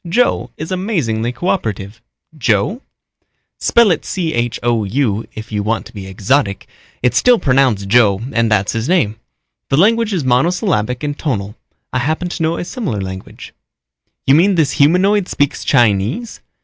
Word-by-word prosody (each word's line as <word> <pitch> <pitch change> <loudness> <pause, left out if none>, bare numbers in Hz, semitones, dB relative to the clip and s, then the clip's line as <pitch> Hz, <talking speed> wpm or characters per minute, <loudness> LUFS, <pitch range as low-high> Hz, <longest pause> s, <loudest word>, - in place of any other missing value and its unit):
Joe 185 - +1
is 160 +4 -6
amazingly 155 - -1
coöperative." 115 - -3 0.4
"Joe?" 120 - 0 0.8
"Spell 235 -4 +4
it 165 - 0
Chou 120 - -1
if 110 0 -8
you 105 -1 -1
want 110 +2 -1
to 115 - -13
be 100 -3 -8
exotic. 100 +2 0 0.4
It's 125 - +2
still 250 -1 +5
pronounced 130 - +2
Joe 105 -3 +4
and 115 -1 +2
that's 105 -2 +1
his 115 +5 -3
name. 115 - +1 0.5
The 135 - +2
language 225 +5 +3
is 180 -7 -1
monosyllabic 130 - 0
and 145 -1 -2
tonal. 105 -9 -3 0.4
I 125 - +1
happen 155 +6 -1
to 175 - -5
know 165 +1 0
a - - -4
similar 175 - -4
language." 95 0 -8 0.7
"You 135 - +4
mean 185 +6 +4
this 155 -5 +2
humanoid 185 +6 +3
speaks 145 -1 -1
Chinese?" 120 - +1
130 Hz, 150 wpm, -17 LUFS, 110-175 Hz, 0.8 s, still